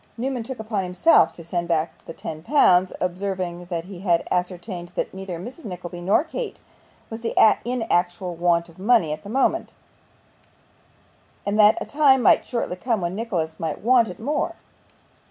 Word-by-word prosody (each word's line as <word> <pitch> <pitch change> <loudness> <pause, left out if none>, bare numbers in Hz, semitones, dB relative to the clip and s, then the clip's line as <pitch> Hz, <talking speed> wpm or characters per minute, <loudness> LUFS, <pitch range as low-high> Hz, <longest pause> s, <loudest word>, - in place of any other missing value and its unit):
Newman 255 +1 -2
took 255 +3 -6
upon 215 -2 -2
himself 180 - +4
to 170 - -12
send 170 +1 -3
back 165 -1 -1
the - - -6
ten 155 -1 -7
pounds, 185 - +4
observing 180 -1 -3
that 170 -2 -3
he 185 0 -10
had 175 -3 +1
ascertained 180 0 -3
that - - -2
neither 190 -2 -6
Mrs. 245 - -9
Nickleby 180 -2 -7
nor 195 +10 +3
Kate 425 +7 -6 0.5
was 225 +1 -7
in 235 +2 +3
actual 175 -2 0
want 170 0 +2
of 170 +1 -18
money 200 -7 +3
at 155 - -7
the 200 - -10
moment, 265 +5 0 1.7
and 205 +1 0
that 210 0 +7
a - - -4
time 275 -4 +4
might - - +4
shortly 235 -7 -2
come 225 +3 0
when 175 0 -2
Nicholas 180 -8 -3
might 160 -2 -3
want 240 0 +4
it 180 - -9
more. 290 +7 -1
185 Hz, 170 wpm, -23 LUFS, 175-230 Hz, 1.7 s, that